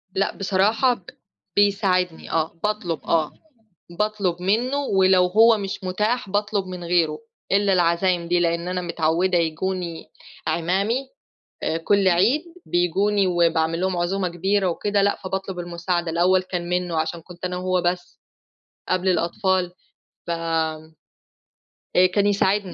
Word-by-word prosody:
لأ، 195 - 0
بصراحة 210 +6 +2
ب 190 - -12 0.5
بيساعدني 195 -4 +1
آه، 165 +1 -1
باطلب 210 -6 -1
آه، 160 -2 +1 0.7
باطلب 200 -5 -1
منُّه 235 +8 +1
ولو 190 -8 +3
هو 220 +4 +5
مش 195 -1 -5
متاح 210 +5 -1
باطلب 205 -1 -1
من 180 -1 -7
غيره، 170 -3 +1 0.3
إلّا 200 0 +3
العزايم 175 0 +2
دي 175 0 +2
لإن 170 0 0
أنا 180 0 -2
متعوّدة 175 +1 +1
ييجوني 170 +1 -3 0.4
اعمامي 195 +11 0 0.6
آآ، 160 - 0
كل 195 +4 +2
عيد، 195 - +3 0.2
بييجوني 190 +3 +1
وباعمل 165 -1 +1
لهم 185 -1 0
عزومة 185 +2 0
كبيرة 190 +3 0
وكده 205 +4 0
لأ، 200 0 +2
فباطلب 190 -1 -4
المساعدة 175 0 -2
الأول 180 +3 +3
كان 175 -2 -4
منُّه 180 -2 -1
عشان 165 +1 -3
كنت 175 +2 -9
أنا 180 - -3
هو 185 0 0
بس 175 0 -3 0.7
قبل 185 +1 +1
الأطفال، 180 0 +1 0.6
ف - - -2
آآ، 160 -2 -3 1.1
كان 205 -1 +2
يساعدني 200 -2 +1
180 Hz, 130 wpm, -23 LUFS, 170-195 Hz, 1.1 s, هو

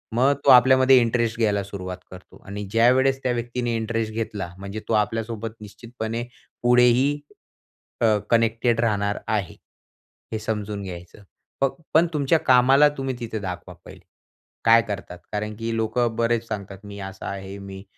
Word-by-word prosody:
मग 130 +4 +4
तो - - +5
आपल्यामध्ये 130 +1 +7
इंटरेस्ट 115 -1 0
घ्यायला 105 -3 +1
सुरुवात 95 -2 -6
करतो. 90 0 -13
आणि 100 +1 -6
ज्यावेळेस 130 +4 +3
त्या 125 - +1
व्यक्तीने 120 0 -2
इंटरेस्ट 110 -1 -2
घेतला. 105 -5 -4
म्हणजे 100 +2 -6
तो - - -1
आपल्यासोबत 115 +1 -5
निश्चितपणे 115 +2 -6 0.4
पुढेही 125 +4 +4 0.8
अ, 115 - +4 0.2
कनेक्टेड 115 0 +2
राहणार 100 -2 0
आहे 105 -5 -1 0.8
हे 110 - -2
समजून 105 -2 -3
घ्यायचं. 90 +2 -9 0.4
फक्त 135 +5 0
पण 165 +2 +5
तुमच्या 150 +2 +2
कामाला 135 +3 +5
तुम्ही 135 -1 -3
तिथे 110 -2 -4
दाखवा 90 -2 -6
पहिले. - - -13 0.6
काय 115 0 +7
करतात? 100 -3 -6
कारण 105 0 -3
की 115 0 -2
लोकं 115 +1 0
बरेच 115 0 0
सांगतात. 100 -3 -6
"मी 100 0 -9
असा 95 0 -9
आहे. 95 0 -6
मी, 95 0 -9
115 Hz, 145 wpm, -23 LUFS, 100-120 Hz, 0.8 s, आपल्यामध्ये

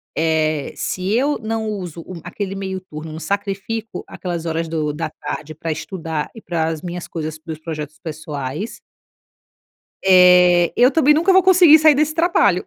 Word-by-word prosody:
eh, 155 -2 0
se 185 +1 -3
eu 275 +6 +1
não 220 -1 -3
uso 180 -6 -5
o 180 -3 -9
aquele 195 +2 -5
meio 190 -1 -4
turno, 155 -3 -9
não 160 - -7
sacrifico 200 +4 -4
aquelas 170 -2 -5
horas 165 0 -2
do 155 -2 -2
da 160 +1 -4
tarde 155 0 -7
para 160 +2 -4
estudar 160 -2 -4
e 225 - -10
para 165 -2 -1
as 160 -1 -4
minhas 175 -1 -6
coisas, 155 -1 -5
para 160 +1 -9
os - - -9
projetos 155 -2 -6
pessoais 155 - -6 1.2
Eh, 180 -2 +6
eu 250 +2 +5
também 300 -2 +4
nunca 340 +6 +3
vou 380 0 +5
conseguir 350 -4 +7
sair 310 -1 +6
desse 305 +2 +1
trabalho. 315 - +2
180 Hz, 170 wpm, -20 LUFS, 160-220 Hz, 1.2 s, conseguir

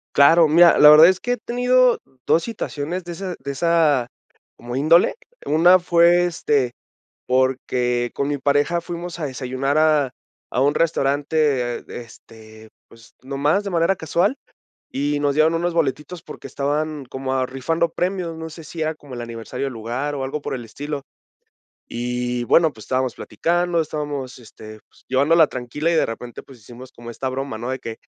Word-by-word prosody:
Claro, 160 +3 +6
mira, 170 +2 +6
la 150 - +9
verdad 155 +2 +9
es 185 0 0
que 245 +6 -1
he 245 - -3
tenido 250 +1 +2 0.3
dos 165 - +3
situaciones 175 -5 -5
de 175 - -8
ese 185 +1 -5
de 140 +1 -6
esa 150 -4 +2 0.5
como 120 +1 -6
índole. 160 +5 +4 0.3
Una 175 +4 +5
fue, 175 0 +4
este, 145 -7 0 0.6
porque 125 -1 0
con 140 0 -2
mi 145 - -1
pareja 145 +5 +1
fuimos 175 0 -7
a 160 - -3
desayunar 135 +2 -2
a 150 -4 +3 0.4
a 125 - -1
un 145 +2 +2
restaurante, 145 -4 0 0.2
este, 110 -1 -15 0.2
pues, 115 -1 -19
nomás 145 +9 0
de 200 - -4
manera 170 +2 +1
casual, 175 - 0 0.5
y 145 +1 -1
nos 145 -1 +1
dieron 155 +2 +3
unos 170 +1 -1
boletitos 155 +2 -2
porque - - -10
estaban 145 +2 -2
como, 130 +1 -4
ah, 130 -1 +1
rifando 135 +6 -1
premios, 180 -1 -2
no 160 0 -6
sé 160 0 -11
si 160 +3 -9
era 155 0 -1
como 145 -3 -15
el 120 - -6
aniversario 120 +3 -5
del 135 - -5
lugar 120 +6 -4
o 135 -2 -3
algo 135 +3 -4
por 145 - -5
el 125 -2 -6
estilo. 140 +5 -6 0.9
Y 125 +1 -3
bueno, 160 +5 +3
pues, 110 - -13
estábamos 130 -1 -1
platicando, 175 0 -1
estábamos, 145 -4 -5
este, 110 -2 -13
pues, - - -26
llevándola 155 +5 +4
tranquila 135 +7 -3
y, - - +1
de - - +3
repente, 120 +1 -8
pues, 130 -4 -16
hicimos 120 +4 -13
como 120 0 -11
esta 130 +3 -4
broma, 135 -2 -4
¿no? 120 +3 -5
De 130 0 -3
que: 115 -1 -7
145 Hz, 175 wpm, -21 LUFS, 130-165 Hz, 0.9 s, la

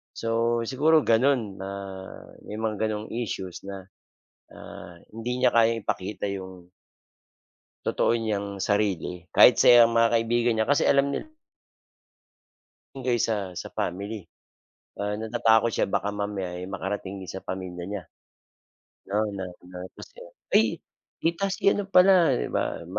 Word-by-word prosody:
So, 115 +1 0
siguro 150 +7 +3
gano'n 115 -5 +2
na 95 +1 -6 0.8
may - - -8
mga 110 -1 -2
ganong 110 0 -4
issues 95 -6 -5
na, 95 -1 -8 0.6
na - - -15 0.5
hindi 115 +3 -4
niya - - +5
kayang 115 -1 +3
ipakita 100 +1 -3
yung, 95 -2 -8 1.2
totoo 120 - +2
niyang 100 -3 -3
sarili 95 -4 -1
kahit 120 - +6
sa 120 -1 +8
mga 115 0 +3
kaibigan 115 +1 +1
niya 110 - +2
kasi 145 +4 +2
alam 140 0 +3
niya 310 - -4 1.7
kaysa, 110 -7 -1
sa - - -7
family. 100 +4 -3 0.8
Ah, 105 0 -1
natatakot 110 +1 +2
siya - - 0
baka 100 +1 -1
mamaya, 100 -3 -4
eh, 90 - -6
makarating 95 0 -5
din 95 - -7
sa 95 - -6
pamilya 90 -2 -6
niya, 100 -2 -5 1.1
'no 105 +2 +1
na 95 -2 -5 0.2
na 90 0 -12 0.2
tapos - - -10
yun, - - -12 0.3
"ay - - +7 0.5
tita 170 +4 0
si 190 - -4
ano 205 - -1
pala" 180 -2 +6
'di - - -2
ba - - -2
110 Hz, 135 wpm, -26 LUFS, 95-120 Hz, 1.7 s, sa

